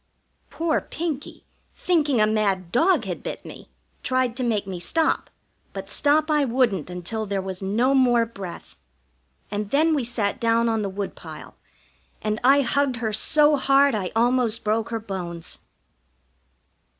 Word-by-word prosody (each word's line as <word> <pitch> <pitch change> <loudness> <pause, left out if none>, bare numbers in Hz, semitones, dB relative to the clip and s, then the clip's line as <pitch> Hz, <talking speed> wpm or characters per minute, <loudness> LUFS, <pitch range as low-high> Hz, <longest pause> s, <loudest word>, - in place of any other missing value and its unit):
Poor 325 -1 0
Pinkie, 315 -4 -5 0.3
thinking 300 -8 +1
a 215 - +5
mad 200 -5 0
dog 335 - +3
had - - -5
bit - - -6
me, - - -11 0.3
tried 255 -2 0
to 260 - -3
make 220 -4 0
me 190 -2 -6
stop, 320 - 0 0.4
but - - -7
stop 305 +2 +2
I 300 -1 +3
wouldn't 235 - +1
until 180 +5 -4
there 200 0 -1
was 190 0 -5
no 225 +8 +1
more 245 -3 +4
breath. 195 - -9 0.7
And 205 0 -3
then 315 +6 +3
we 285 -4 0
sat 230 -1 -1
down 230 0 +2
on 225 -1 0
the 200 - -2
woodpile, 195 +1 -7 0.6
and 215 0 -2
I 275 +3 +6
hugged 280 0 +1
her 225 -2 -3
so 300 +5 +4
hard 275 +1 +4
I 195 -4 -2
almost 235 -1 +2
broke 220 +1 0
her 230 -1 -2
bones. 180 -5 -6
230 Hz, 150 wpm, -24 LUFS, 205-275 Hz, 0.7 s, I